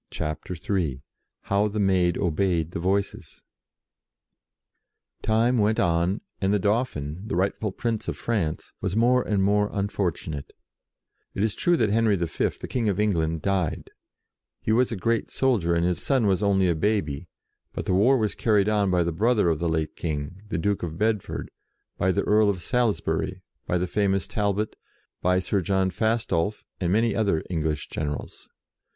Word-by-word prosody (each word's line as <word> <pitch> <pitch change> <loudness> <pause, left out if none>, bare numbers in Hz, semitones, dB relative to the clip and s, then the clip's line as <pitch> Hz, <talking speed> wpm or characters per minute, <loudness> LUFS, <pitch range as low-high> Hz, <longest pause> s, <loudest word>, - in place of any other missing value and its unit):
CHAPTER 75 +4 -4
III 80 -7 -2 0.4
HOW 100 +2 +1
THE 105 +1 -3
MAID 90 -3 +2
OBEYED 85 -2 0
THE - - -4
VOICES 95 +3 -2 1.8
TIME 115 +3 +2
went 110 +1 +2
on, 85 +3 +1 0.2
and 95 0 +2
the 105 - +4
Dauphin, 95 - -1
the - - -2
rightful 100 +3 0
Prince 115 +2 -3
of - - -3
France, 100 -10 -2
was 95 - -2
more 125 +3 +4
and 100 -5 0
more 105 +1 +2
unfortunate. 90 -7 -3 0.8
It 100 - 0
is 110 -2 +1
true 175 +8 +2
that 105 - +2
Henry 110 -1 +3
V., 85 -2 -1 0.2
the - - -7
King 115 -4 0
of 100 0 -1
England, 80 -6 0
died. 95 -4 -1 0.7
He - - -2
was 120 +3 +3
a - - -1
great 115 +4 0
soldier, 105 -11 +1
and 85 0 +2
his 90 -1 0
son 130 -5 +2
was 95 -1 +2
only 95 -2 +3
a 85 - +3
baby, 80 -6 -1 0.4
but - - -5
the - - +1
war 115 +9 +5
was 110 -4 0
carried 105 -3 +2
on 105 -2 +2
by 90 -1 +3
the 85 - -1
brother 105 +2 +2
of 80 -2 0
the 85 0 0
late 80 -1 -1
King, 80 +3 -4
the - - -1
Duke 100 +4 0
of 80 -2 -4
Bedford; 105 -1 -1 0.5
by 95 - +3
the 100 +2 0
Earl 105 0 +4
of 90 -4 -2
Salisbury; 120 -1 0 0.2
by 90 - +1
the 90 - 0
famous 95 0 0
Talbot; 105 0 -1 0.5
by 90 +1 +3
Sir 95 +2 0
John 95 0 +1
Fastolf, 105 -2 0 0.2
and 90 -2 0
many 110 +1 +2
other 100 -8 +1
English 80 -3 -1
generals. 75 -1 -5
100 Hz, 170 wpm, -25 LUFS, 85-110 Hz, 1.8 s, war